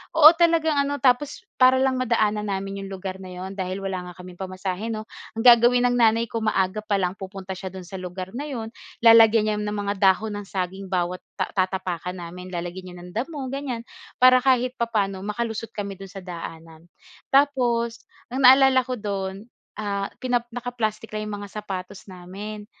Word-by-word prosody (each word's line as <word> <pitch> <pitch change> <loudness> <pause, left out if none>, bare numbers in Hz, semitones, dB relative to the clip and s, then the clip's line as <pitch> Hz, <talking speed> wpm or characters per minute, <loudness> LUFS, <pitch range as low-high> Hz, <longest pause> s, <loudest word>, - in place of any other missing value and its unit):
oo, 315 -1 +10
talagang 330 -2 +3
ano, 280 +1 0
tapos 270 +2 +1 0.2
para 255 0 +7
lang 260 -1 +1
madaanan 215 -4 +1
namin 195 0 -3
iyong 195 - -7
lugar 190 0 -6
na 185 - -9
yun 185 +1 -6
dahil 190 0 -4
wala 180 -2 -4
nga - - -13
kaming 180 -1 -11
pamasahe, 185 +2 -4
'no, 220 -1 -3 0.3
ang 225 - -2
gagawin 245 0 +7
ng - - +1
nanay 230 0 +4
ko, 230 - -1
maaga 205 -2 0
pa 210 -1 0
lang 185 -1 -1
pupunta 190 -1 -7
siya 190 0 -6
doon 185 0 -8
sa 190 +2 -8
lugar 185 +1 -6
na 285 +5 -4
iyon, 230 -6 -5 0.3
lalagyan 225 -1 +7
niya 210 -1 0
ng 210 0 -3
mga 205 -1 -1
dahon 200 +3 +3
ng 205 - -9
saging 190 0 -4
bawat 180 -1 -1 0.2
ta - - -2
tatapakan 185 -2 -2
namin, 180 +1 -8
lalagyan 180 +1 -6
niya - - -11
ng 180 - -10
damo, 270 +5 -3
ganyan. 260 -4 -4 0.3
Para 255 0 +7
kahit 255 -1 +2
papaano 210 -6 -1
makalusot 220 +2 -3
kami 200 -1 -5
doon 195 - -8
sa 195 - -11
daanan. 165 -1 -9 0.4
Tapos 245 -5 +2 0.3
ang 265 - -1
naalala 265 0 +7
ko 255 0 -4
doon, 200 -1 -4 0.3
ah, 200 -2 -2
kinap 245 -2 -1
naka-plastic 230 -3 -4
lang 215 0 -3
iyong 205 - -4
mga - - -12
sapatos 190 0 -7
namin, 195 +4 -8
210 Hz, 185 wpm, -24 LUFS, 190-240 Hz, 0.4 s, oo